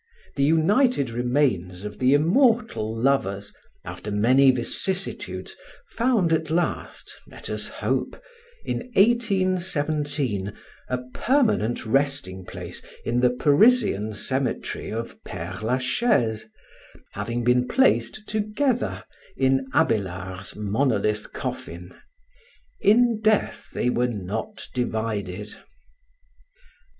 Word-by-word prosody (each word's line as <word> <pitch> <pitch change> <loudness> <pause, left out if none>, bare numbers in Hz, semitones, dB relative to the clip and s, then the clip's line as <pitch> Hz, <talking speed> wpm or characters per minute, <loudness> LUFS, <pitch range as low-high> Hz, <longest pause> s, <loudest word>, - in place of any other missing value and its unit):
The 140 - +1
united 160 - +3
remains 115 -7 0
of 105 0 -7
the 130 +2 +4
immortal 215 - +2
lovers, 100 -7 0 0.3
after 105 - -7
many 125 +7 +4
vicissitudes, 185 +10 -1 0.4
found 230 -9 +2
at 160 -1 0
last 170 +2 -2
(let - - -8
us - - -3
hope), - - -2 0.5
in - - -1 0.2
1817, 155 - +1 0.4
a 125 - 0 0.2
permanent 220 - +1
resting 135 -7 -1
place, - - -8 0.2
in 120 +1 +1
the 125 0 +4
Parisian 145 - +3
cemetery 130 +6 -2
of 115 +1 -5
Père 95 +1 -7
Lachaise, 125 - +1 0.6
having 120 +1 -3
been 125 +1 +3
placed 225 - +2
together 220 +5 -1 0.3
in 135 0 +2
Abélard's 95 -3 -1
monolith 105 -1 0
coffin. 85 +2 -6 0.9
"In 230 +1 +4
death 215 -1 +1
they 125 - 0
were 125 0 +1
not 105 0 -5
divided." 105 -5 -3
130 Hz, 95 wpm, -24 LUFS, -, 0.9 s, the